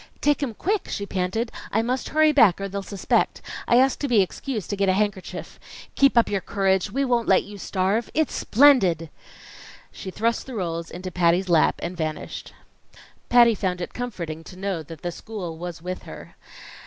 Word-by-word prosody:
"Take 295 0 +2
'em 250 -6 -2
quick!" 400 - -1
she 200 - -3
panted. 195 +5 -2 0.2
"I 220 +2 +1
must 250 +2 -2
hurry 310 0 +4
back, 230 - +5
or 195 - -3
they'll 200 +1 -4
suspect. 195 0 0 0.3
I - - +4
asked 265 +1 +3
to 285 - -1
be 240 -5 +4
excused 215 +2 -5
to - - 0
get 195 -1 +1
a - - +4
handkerchief. 205 -1 -3 0.3
Keep 275 -3 +4
up 235 - +6
your 200 -2 -1
courage. 190 0 +1
We 275 +7 0
won't 240 -3 +1
let 190 - +4
you 205 0 -11
starve. 195 +5 0
It's 315 -2 +1
splendid!" 195 - +4 0.8
She 190 - -8
thrust 230 +7 -1
the 260 - -7
rolls 170 -4 -3
into 185 +1 -7
Patty's 180 +2 +2
lap 165 -3 +4
and 175 +2 -4
vanished. 155 -2 -5 0.8
Patty 240 -1 +6
found 185 -4 -2
it 175 - -5
comforting 175 -10 -5
to 180 - -11
know 190 -3 -2
that 160 0 -11
the 175 - -2
school 180 -3 -7
was 175 -2 -7
with 185 +1 -4
her. - - -11
195 Hz, 190 wpm, -24 LUFS, 180-235 Hz, 0.8 s, up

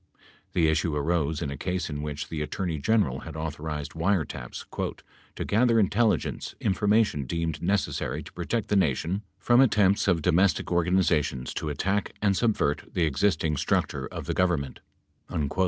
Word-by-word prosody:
The 85 -3 +3
issue 80 0 +1
arose 80 +1 0
in 70 - -3
a - - -4
case 90 -1 -2
in 75 -1 -4
which 75 -1 -5
the 80 -2 -3
Attorney 80 +1 -2
General 70 - +2
had 80 0 -9
authorized 75 -1 -4
wiretaps 80 -8 -2 0.7
"to - - -3
gather 115 +2 +3
intelligence 110 +2 +1
in 95 - +1
formation 105 -8 +2
deemed 80 +1 -2
necessary 95 +2 -1
to - - -13
protect 115 -2 -2
the 105 - +2
Nation 90 +2 +1 0.2
from 120 +1 +4
attempts 105 -7 +3
of 90 - +5
105 80 - -5
domestic 90 +4 +2
organizations 85 -7 +1
to 75 - -3
attack 95 +7 -1
and 100 -2 +2
subvert 105 -10 +1
the 85 - +1
existing 80 0 +1
structure - - 0
of - - -7
the - - -1
Government." 85 -7 0
85 Hz, 155 wpm, -27 LUFS, 75-100 Hz, 0.7 s, of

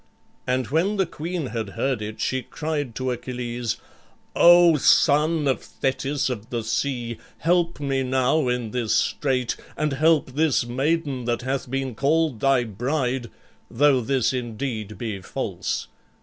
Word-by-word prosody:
And 125 -2 0
when 170 +9 +1
the 190 - +3
queen 170 0 -4
had 115 -4 -4
heard 130 -1 0
it, 110 +1 -6
she 130 0 0
cried 145 -2 -4
to 130 -1 -1
Achilles, 120 -1 -3 0.6
"O 175 -1 +7
son 150 +2 +4
of 135 - +1
Thetis 135 +1 -2
of 120 -3 -5
the 120 -2 -2
sea! 115 +1 -2 0.2
help 170 0 +1
me 135 -2 0
now 130 +3 +1
in 125 -3 -1
this 120 -3 0
strait 125 +1 0 0.2
and 150 -2 0
help 155 -1 +3
this 150 -2 +2
maiden 135 +1 -1
that 120 0 -1
hath 130 0 -2
been 135 -1 -2
called 145 +1 +1
thy 135 -1 +3
bride, 125 +2 -2 0.4
though 135 +1 +3
this 130 0 +1
indeed 115 -4 -4
be 105 -4 -4
false. 90 - -3
130 Hz, 145 wpm, -24 LUFS, 120-150 Hz, 0.6 s, O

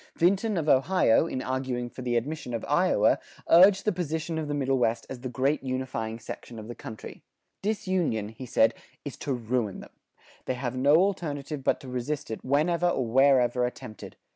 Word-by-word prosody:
Vinton 195 +4 +2
of 160 -2 -1
Ohio, 145 0 +4
in 130 -5 -4
arguing 130 -1 -2
for 125 - -10
the 120 -1 0
admission 125 0 -3
of 115 - -4
Iowa, - - +3 0.3
urged 190 +3 +6
the 210 - +3
position 160 -2 -3
of 155 - -3
the 145 - -2
Middle 135 -2 +1
West 115 -1 0
as 130 - -6
the 130 +1 -5
great 135 +4 0
unifying 130 -4 -3
section 115 0 -9
of 110 0 -8
the 120 - -6
country: 110 -2 -9 0.4
"Disunion," 185 - -1
he 120 +3 -9
said, 115 -1 +3 0.3
"is - - -5
ruin 120 -5 -1
to - - -8
them. - - -12 0.6
They 130 - -1
have 125 -1 -4
no 140 +4 +4
alternative 155 -6 0
but - - +1
to 135 - -10
resist 130 +3 -3
it 110 - -5
whenever 165 +6 +2
or 130 -7 0
wherever 125 0 +4
attempted. 115 -3 -6
130 Hz, 185 wpm, -27 LUFS, 120-160 Hz, 0.6 s, urged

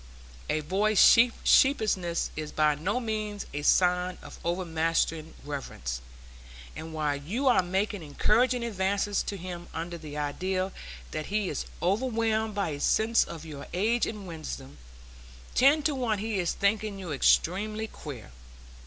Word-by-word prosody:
A 155 - +1
boy's 200 +7 +1 0.5
sheepishness 200 -10 +3
is 155 -1 -5
by 155 -1 +3
no 185 +11 -1
means 215 -3 -3
a 145 - -3
sign 180 +3 +3
of - - -11
overmastering 165 -2 -1
reverence; 65 - -5 0.7
and 160 +1 -7
while 150 -2 0
you 210 - -2
are 245 - +5
making 190 +2 -1
encouraging 235 - +2
advances 200 -1 0
to 200 - -4
him 175 -1 -7
under 170 +1 -4
the 150 -2 -8
idea 185 +6 -1 0.4
that 155 - -4
he 205 -2 0
is 145 - -4 0.2
overwhelmed 220 +1 +1
by 200 -4 0
a 145 -2 -4
sense 225 +8 +3
of 165 -1 -8
your 145 -3 -8
age 225 +6 +2
and 210 -3 -6
wisdom, 155 -5 -7 0.7
ten 285 +4 +5
to 300 - +2
one 245 -5 0
he 215 0 -2
is 175 -2 0
thinking 205 0 0
you 185 -4 -6
extremely 210 +9 +2
queer. 140 - -9
185 Hz, 145 wpm, -28 LUFS, 160-215 Hz, 0.7 s, are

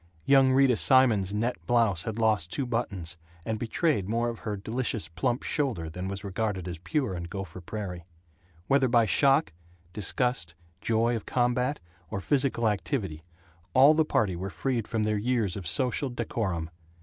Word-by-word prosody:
Young 135 -1 +5
Rita 130 -3 +4
Simons's 115 -8 +4
net 115 +4 -2
blouse 115 -7 +2
had 110 -1 -4
lost 105 -7 +1
two 140 - -1
buttons, 100 -8 -3 0.3
and 110 -1 -2
betrayed 125 - 0
more 115 +2 0
of 115 - -6
her 105 -2 -4
delicious 115 +2 -2
plump 125 - -2
shoulder 110 - -2
than 90 +3 -5
was 100 +1 -5
regarded 100 -2 -2
as 85 -2 -5
pure 110 - -1
in 85 -1 -5
Gopher 95 0 -7
Prairie. 90 -2 -6 0.6
Whether 135 +3 +3
by 120 -2 +4
shock, 135 - +3 0.4
disgust, 105 -3 -1 0.3
joy 115 +1 +1
of 110 - -6
combat, 125 +3 +1 0.3
or 100 - -3
physical 130 0 +1
activity, 100 - -2 0.5
all 135 +4 +8
the 160 0 +3
party 105 - 0
were 95 +3 -4
freed 120 +1 -2
from 110 -2 -1
their 105 -1 0
years 115 -5 0
of 95 -4 -5
social 125 - 0
decorum. 105 -9 -3
110 Hz, 160 wpm, -28 LUFS, 95-125 Hz, 0.6 s, all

